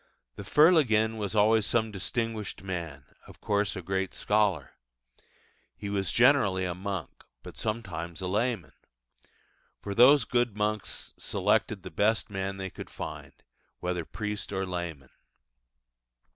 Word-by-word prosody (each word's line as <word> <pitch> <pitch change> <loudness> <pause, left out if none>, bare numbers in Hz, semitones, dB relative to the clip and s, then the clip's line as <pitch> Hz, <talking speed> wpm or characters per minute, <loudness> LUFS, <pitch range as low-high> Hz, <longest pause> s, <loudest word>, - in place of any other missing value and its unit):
The - - -7
Fer 150 - +6
leginn 110 -8 +3
was 105 0 -3
always 110 +1 +4
some 110 +1 +1
distinguished 110 +1 -3
man 85 -8 -5 0.2
of - - -14
course 105 -1 0
a 95 - -6
great 95 +1 -2
scholar. 105 -9 +1 1.0
He 100 +8 -6
was 95 -3 -1
generally 115 -8 +4
a 90 - -2
monk, 95 -1 -5 0.2
but - - -10
sometimes 85 -7 -4
a 95 - -4
layman; 105 -1 -1 1.1
for 100 - -5
those 125 +3 +7
good 120 -4 0
monks 105 0 -2
selected - - 0
the - - -8
best 110 +1 +1
man 95 0 -3
they 95 -1 -5
could - - -9
find, - - -7 0.5
whether 90 -1 -2
priest 105 +3 -5
or 95 -1 -1
layman. 85 -7 -5
100 Hz, 135 wpm, -29 LUFS, 95-110 Hz, 1.1 s, those